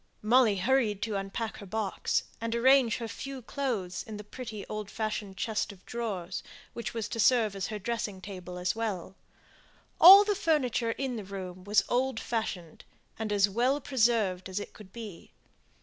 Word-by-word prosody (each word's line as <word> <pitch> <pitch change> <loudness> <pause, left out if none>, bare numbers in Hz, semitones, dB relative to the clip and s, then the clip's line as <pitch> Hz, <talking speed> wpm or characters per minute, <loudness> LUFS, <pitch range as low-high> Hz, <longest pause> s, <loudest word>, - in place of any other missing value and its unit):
Molly 230 -1 +5
hurried 215 -1 +1
to 215 -2 -2
unpack 195 +3 -3
her 200 - -9
box, 210 -1 -1 0.2
and 230 0 -2
arrange 255 -1 +5
her 230 - -4
few 270 +2 -7
clothes 220 -10 -3
in 220 -2 -8
the 210 - -8
pretty 215 -1 -7
old 215 -1 -5
fashioned 215 -3 -4
chest 220 +1 -1
of 195 -2 -17
drawers, 195 -7 -4 0.3
which 235 0 -5
was 225 -2 -2
to 230 - -4
serve 225 -2 +4
her - - -7
as 195 +2 -3
dressing 220 -4 -3
table 180 -2 -8
as 180 +2 -1
well. 205 -6 -3 0.9
All 390 +4 +11
the 415 0 +1
furniture 290 - +1
in 260 -2 -3
the 215 - -5
room 185 -2 -7
was 205 0 +4
as - - -14
old 255 -1 0
fashioned 185 -8 -4 0.4
and 220 -1 -2
as 205 -1 +4
well 245 +8 +1
preserved 220 -9 +1
as 185 - -2
it 205 - -8
could 205 -3 -14
be. 215 -7 -9
220 Hz, 180 wpm, -29 LUFS, 195-240 Hz, 0.9 s, All